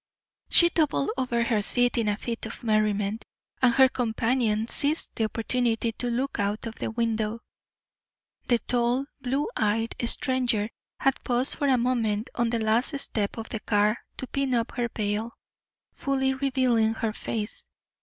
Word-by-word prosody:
She 345 - +6
doubled 290 - +1
over 250 -2 0
the 225 -3 +1
seat 245 +3 +1
in 230 -2 0
a 205 - -1
fit 230 -1 -4
of 235 - -10
merriment, 215 -1 0 0.4
and 250 -2 +5
her 265 -1 +7
companion 225 -2 0
seized 295 +5 +2
the 225 - 0
opportunity 230 +1 -1
to 245 +2 -3
look 250 +2 -2
out 205 +2 -1
of 225 - -5
the - - -4
window. 225 -1 -2 1.1
The 240 - +3
tall, 245 +3 0 0.2
blue 270 +3 -1
eyed 225 +1 0
stranger 235 -4 0 0.3
had 270 -1 0
paused 250 +2 +7
for 285 - -1
a 260 -2 +4
moment 235 -3 -1
on 235 -1 0
the 235 - 0
last 230 +6 +1
step 210 -6 -1
of 225 - -6
the 220 - -4
car 210 0 +2 0.2
to - - -4
pin 270 -1 -1
up 230 0 -1
her 240 -2 -2
veil, 215 +2 -2 0.6
fully 265 -1 0
revealing 255 -5 +1
her 225 -1 -2
face. 215 0 -4
235 Hz, 160 wpm, -26 LUFS, 220-255 Hz, 1.1 s, her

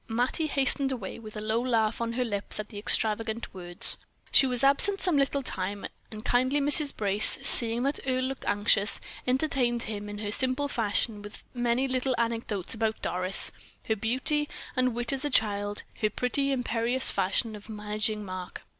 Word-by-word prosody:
Mattie 245 +7 0
hastened 275 -1 +2
away 230 -6 -6
with 215 -1 -10
a - - -5
low 220 +2 -1
laugh 225 -3 0
on 230 0 -2
her 250 +1 -1
lips 205 -2 0
at 215 - -6
the 205 - -8
extravagant 220 +1 0
words. 180 +3 +5 0.3
She 270 - +6
was 250 0 0
absent 335 +9 +4
some 360 -4 +1
little 275 0 0
time, 200 -3 -3 0.2
and 215 -1 -10
kindly 255 +4 +1
Mrs. 290 0 +6
Brace, 205 0 +5
seeing 235 0 +2
that 280 +2 -1
Earle 255 0 0
looked 265 +1 -5
anxious, 205 0 +1 0.3
entertained 250 -3 +1
him 205 -1 -6
in 205 - -7
her 205 0 -5
simple 260 +5 0
fashion 220 -3 -2
with 205 0 -11
many 245 +1 0
little 255 0 -1
anecdotes 230 -5 -2
about 220 -1 -2
Doris, 185 +2 +1 0.4
her 220 - +2
beauty 260 +7 -1 0.3
and 255 -2 0
wit 240 +2 -1
as 270 - -2
a 295 - -1
child, 205 -4 0 0.2
her 215 - +2
pretty, 275 +5 -1
imperious 245 0 +1
fashion 200 +4 -1
of 210 +1 -13
managing 210 0 -4
Mark. 185 -1 -8
230 Hz, 175 wpm, -27 LUFS, 210-260 Hz, 0.4 s, She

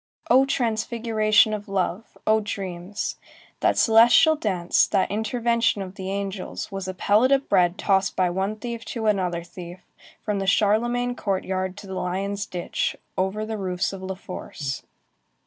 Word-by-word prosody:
Oh 265 +2 +6
transfiguration 220 -3 +2
of 210 0 -5
love! 195 +1 -2
Oh 220 0 +4
dreams! 195 -1 -4 0.4
That - - +2
celestial 235 +8 +6
chance, 185 - +1
that 190 - +1
intervention 230 0 +1
of 185 -1 -9
the 190 -1 -6
angels, 195 -1 -4
was 195 -1 -5
a 185 - -4
pellet 215 +7 +3
of 275 0 +3
bread 175 +1 +3
tossed 195 -1 +1
by 180 -1 +2
one 190 +4 -1
thief 235 +1 -6
to 230 -2 -4
another 180 -5 +1
thief, 175 +1 -10 0.4
from 210 -2 -2
the 195 - -3
Charlemagne 240 +5 +2
Courtyard 190 -2 -2
to 205 - -9
the 190 - -7
Lion's 195 +3 -2
Ditch, 175 -1 -2 0.2
over 190 +3 -1
the 220 -1 -4
roofs 185 0 -1
of 195 - -7
La 190 0 -4
Force. 150 -7 -6
200 Hz, 155 wpm, -24 LUFS, 185-220 Hz, 0.4 s, Oh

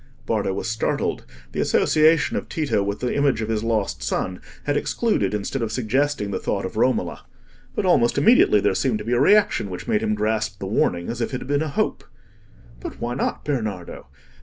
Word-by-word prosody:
Bardo - - 0
was 95 - -3
startled: 110 -1 -1 0.3
the - - -4
association 155 +1 +3
of - - -3
Tito 150 -10 0
with 100 +1 -3
the 125 - -1
image 140 -5 +2
of 110 -1 -3
his 110 -1 -1
lost 110 - -1
son 90 +9 -2 0.2
had 145 - 0
excluded 145 - 0
instead 105 +6 -3
of 115 -2 -2
suggesting 125 -1 0
the 95 - -2
thought - - -2
of - - -6
Romola. - - 0 0.5
But - - -1
almost 120 0 +3
immediately 140 - +5
there - - +2
seemed 120 +2 0
to 105 - -7
be 120 - 0
a 120 - +3
reaction 205 - +4
which 90 -1 -7
made 105 - +1
him 105 -1 0
grasp 110 +1 -1
the - - -6
warning 85 0 0
as 120 +1 -4
if 115 - -2
it 130 - -4
had - - -8
been 145 +1 +1
a 160 - -1
hope. 140 - -1 0.8
"But - - -8
why 120 +1 -2
not, 130 - -2
Bernardo? 110 - -4
115 Hz, 205 wpm, -23 LUFS, 105-140 Hz, 0.8 s, immediately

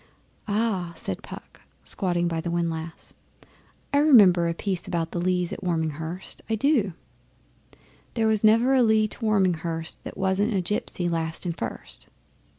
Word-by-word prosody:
'Ah!' 200 -5 -1
said 95 - -5
Puck, - - -11 0.2
squatted 175 -2 -1
by 165 -1 -2
the 170 - -4
windlass. 165 -1 -3 0.8
'I 285 - +5
remember 200 - +6
a 170 - 0
piece 185 -1 -2
about 170 -3 -2
the 175 - -2
Lees 180 -1 0
at - - -7
Warminghurst, 160 0 -3
I 225 - +2
do: 225 - +2 1.2
'There 225 -2 +1
was 220 -1 +2
never 230 +5 +5
a 260 - +5
Lee 220 -2 +4
to - - -9
Warminghurst 175 -7 0
That - - -8
wasn't 195 +3 +1
a 190 - +2
gipsy 180 -1 -2
last 165 0 -2
and 170 -2 -2
first. - - -6
185 Hz, 155 wpm, -25 LUFS, 170-215 Hz, 1.2 s, remember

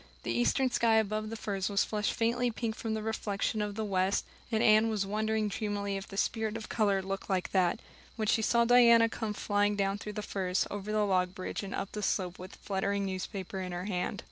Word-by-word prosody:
The - - -2
eastern 120 - +2
sky 230 -2 +3
above 215 0 +1
the 225 - -5
firs 200 -3 -2
was 200 0 +2
flushed 210 -1 -1
faintly 240 +2 +1
pink 225 -1 -3
from 225 -1 -3
the 215 - -3
reflection 215 -1 -1
of 205 -1 -3
the 220 0 -2
west, 190 -1 +1 0.3
and 220 -1 +2
Anne 215 +1 +5
was 210 -3 0
wondering 215 +1 0
dreamily 205 -1 -2
if 195 0 -5
the 195 - -9
spirit 220 +1 0
of 225 - -8
color 200 -4 +1
looked 195 +1 -5
like 185 -2 0
that, 180 -3 +2 0.4
when 220 -2 -2
she 220 - +3
saw 235 +2 +3
Diana 235 -1 +7
come 220 -2 -3
flying 205 0 +1
down 195 0 0
through 210 +1 -6
the 210 0 -4
firs, 185 -2 0
over 205 +1 -4
the 215 -1 +2
log 185 -2 +1
bridge, 185 - -4
and 200 -1 -5
up 200 - -4
the 210 - -4
slope, 185 -2 -1
with 185 +1 -9
a - - -21
fluttering 200 0 -1
newspaper 190 0 -4
in 180 -1 -5
her 175 +1 -4
hand. 195 +1 -2
205 Hz, 225 wpm, -31 LUFS, 195-220 Hz, 0.4 s, Diana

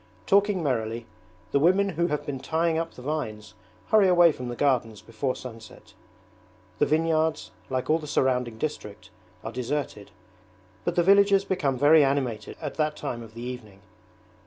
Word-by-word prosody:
Talking 200 -2 +2
merrily, 115 -4 -2 0.5
the 140 - +3
women 190 +6 +3
who 170 -1 0
have 150 -3 -3
been 140 -2 -4
tying 165 +4 0
up 165 0 -5
the 125 - -11
vines 120 -8 -4 0.4
hurry 215 -3 +5
away 175 -2 +6
from 125 -4 -7
the 120 - -5
gardens 120 -6 0
before 115 +4 -3
sunset. 115 -3 -11 0.9
The - - +3
vineyards, 160 0 0 0.2
like 130 -1 -2
all 160 +1 +2
the 150 - -8
surrounding 125 -5 0
district, 110 -7 -6 0.3
are 110 - -5
deserted, 125 -4 -4 0.8
but 175 - -1
the 175 - +3
villages 200 +1 +5
become 145 -9 -1
very 145 +3 +6
animated 130 -6 -2
at 150 -3 -6
that 155 -1 0
time 120 - -5
of 110 -1 -12
the 120 - -7
evening. 115 -6 -8
140 Hz, 160 wpm, -26 LUFS, 120-165 Hz, 0.9 s, away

